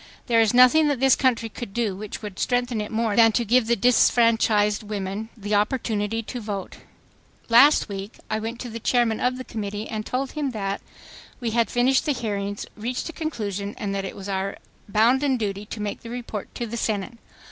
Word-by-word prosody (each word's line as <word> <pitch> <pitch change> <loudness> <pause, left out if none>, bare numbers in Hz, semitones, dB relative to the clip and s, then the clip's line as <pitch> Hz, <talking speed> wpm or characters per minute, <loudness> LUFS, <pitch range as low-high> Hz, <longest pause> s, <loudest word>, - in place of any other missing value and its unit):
There 230 -2 +4
is 220 -2 +3
nothing 255 +5 +6
that 285 -4 0
this 265 -1 +5
country 235 -3 +1
could 225 -2 -8
do 225 -5 0
which 210 +2 -7
would 205 -3 -7
strengthen 245 -2 0
it 210 - -6
more 220 -2 0
than 225 0 +6
to 235 - +1
give 235 +1 +3
the 235 - +3
disfranchised 225 -2 +3
women... 205 0 -4
the 205 0 -4
opportunity 215 0 0
to 245 +3 -6
vote.... 205 -3 -5 0.7
"Last 270 +6 +6
week... 200 +1 -7
I 215 - -1
went 230 +2 -5
to 245 - -5
the 230 - -5
Chairman 235 -1 +1
of 250 0 0
the 255 - -5
Committee 210 -2 -5
and 215 -1 -4
told 260 +4 -2
him 295 -3 -2
that... 195 -1 -2 0.6
we 235 -3 -2
had 230 0 +2
finished 255 +3 +2
the 295 - +3
hearings, 205 -4 -3
reached 245 +8 -4
a - - -7
conclusion 210 - -4
and 200 -1 -3
that 195 0 -2
it - - -6
was 195 0 -8
our 195 0 -2 0.3
bounden 255 +6 +3
duty 205 -2 -3
to 215 - -7
make 210 -1 -4
the 230 - -9
report 235 -4 -6
to 240 - -3
the 235 +1 -5
Senate 220 +1 -2
225 Hz, 200 wpm, -24 LUFS, 205-245 Hz, 0.7 s, nothing